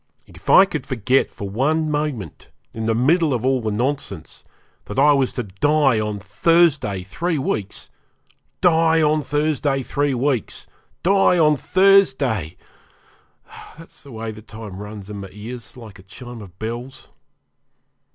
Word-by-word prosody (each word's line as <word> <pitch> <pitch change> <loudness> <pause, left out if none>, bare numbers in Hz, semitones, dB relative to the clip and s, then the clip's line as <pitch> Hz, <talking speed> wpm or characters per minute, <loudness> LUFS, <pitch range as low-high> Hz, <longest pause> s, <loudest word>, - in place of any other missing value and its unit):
If - - -12
I 190 - +8
could 195 - -5
forget 130 +1 +1
for 100 - -7
one 150 +9 0
moment, 145 - -4 0.2
in 110 0 -4
the 115 - +1
middle 150 +4 +2
of 120 +1 -3
all 130 -1 +2
the 110 - -2
nonsense, 105 - -4 0.4
that 105 - -8
I 145 +2 +6
was 135 -2 +1
to 125 - -3
die 135 +5 +2
on 105 -1 -2
Thursday 135 - +2
three 165 - -2
weeks! 105 -7 -4 0.7
die 165 -2 +4
on 155 0 +2
Thursday 145 -2 -1
three 145 +1 -1
weeks! 130 -2 -2 0.4
die 195 -1 +4
on 150 -2 +4
Thursday! 135 - +2 1.2
That's 165 - -14
the 140 - -14
way 110 -1 -5
the 110 0 -11
time 110 -3 -10
runs 105 -1 -9
in 105 - -6
my 100 -1 -8
ears 115 +4 -9
like 110 -6 -12
a - - -12
chime 120 +5 -11
of 95 -3 -13
bells. 120 +4 -7
130 Hz, 150 wpm, -21 LUFS, 105-150 Hz, 1.2 s, I